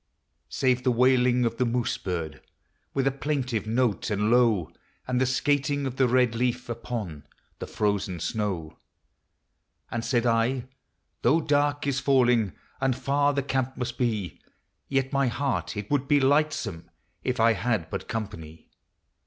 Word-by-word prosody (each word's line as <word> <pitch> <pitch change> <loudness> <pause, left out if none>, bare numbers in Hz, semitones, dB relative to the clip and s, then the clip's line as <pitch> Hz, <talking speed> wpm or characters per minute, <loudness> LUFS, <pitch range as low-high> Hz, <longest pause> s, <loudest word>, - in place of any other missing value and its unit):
Save 130 -1 +1
the 130 - +1
wailing 125 0 +3
of 115 0 -1
the 125 - +2
moose 120 0 -1
bird 85 -5 -4 0.5
With 135 -1 +1
a 135 - +3
plaintive 130 -6 -2
note 115 -1 0
and 105 +1 +1
low, 115 -8 +3 0.4
And 125 0 0
the 130 - +3
skating 140 +2 +1
of 130 -1 -4
the 130 - +4
red 125 -1 +3
leaf 125 +1 -1
Upon 110 -11 -5 0.3
the - - -5
frozen 100 -4 -1
snow. 95 -5 -3 1.1
And 115 -1 -2
said 120 0 +1
I, 120 +2 +2 0.3
" - - -50
Though 140 +7 +4
dark 145 -1 +1
is 140 -1 0
falling, 125 -8 +3 0.3
And 135 -2 +2
far 145 +2 +1
the 140 - 0
camp 130 -1 -2
must 125 -1 -4
be, 110 -8 -2 0.5
Yet 135 0 0
my 140 -1 +2
heart 135 -2 -2
it 105 +4 -5
would 140 -2 +1
be 145 0 +4
lightsome 135 - +1 0.3
If 125 -2 -1
I 115 0 +5
had 105 -4 -1
but - - -4
company." 80 -9 -6
125 Hz, 155 wpm, -26 LUFS, 110-135 Hz, 1.1 s, I